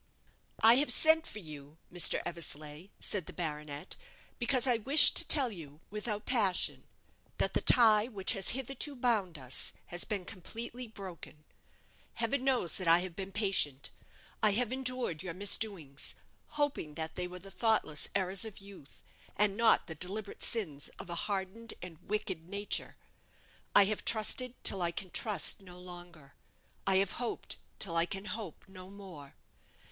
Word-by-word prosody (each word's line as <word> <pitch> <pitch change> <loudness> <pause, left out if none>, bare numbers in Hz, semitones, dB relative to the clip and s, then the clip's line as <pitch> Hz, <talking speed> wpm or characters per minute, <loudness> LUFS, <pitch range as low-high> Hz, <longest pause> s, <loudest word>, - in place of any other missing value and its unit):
"I 230 +2 +8
have 290 +2 +2
sent 320 0 +6
for - - -7
you, 150 -5 -11 0.2
Mr. 175 - +1
Eversleigh," 155 0 -4
said 190 -6 -1
the - - -9
baronet, 150 -3 -6 0.4
"because 255 +1 +1
I 245 -3 +3
wished 275 +7 +9
to 340 - +8
tell 270 -6 +6
you, 155 -6 -11
without 210 0 -5
passion, 210 -8 +1 0.5
that - - 0
the - - 0
tie 220 -3 +6
which 200 -6 -2
has 195 - +1
hitherto 270 +3 -2
bound 215 -9 -1
us 130 -2 -1 0.2
has 175 - -1
been 200 -5 -4
completely 230 +6 -7
broken. 185 -7 -11 0.7
Heaven 235 +3 -1
knows 250 -10 +1
I 170 -1 +4
have 180 -2 -7
been 195 +1 -7
patient; 190 -10 -1 0.5
I 215 -2 +4
have 240 +2 -1
endured 255 -10 -1
your 180 -3 -6
misdoings, 195 -7 0 0.3
hoping 290 - -3
that 160 0 -6
they 180 0 -4
were 180 0 -9
the 195 +2 -11
thoughtless 220 -10 0
errors 190 -1 +1
of 220 -3 -7
youth, 195 -8 -15 0.3
and 205 -1 +1
not 230 +1 +3
the 160 - -7
deliberate 195 +6 -6
sins 160 -11 0
of 175 - -8
a - - -3
hardened 200 +4 -5
and 170 -3 -11
wicked 190 -5 -4
nature. 200 +1 -3 0.8
I 200 - +8
have 210 +1 -2
trusted 235 +3 0
till 195 - -1
I 170 - 0
can 180 +2 -6
trust 205 -3 +2
no 180 -2 -14
longer; 175 -5 -12 0.5
I 195 - +3
have 190 0 +2
hoped 240 - -4 0.2
till 170 -5 -2
I 165 +1 +2
can 195 +1 -6
hope 220 0 -7
no 185 -1 -12
more. 185 -8 -12
195 Hz, 160 wpm, -31 LUFS, 170-225 Hz, 0.8 s, wished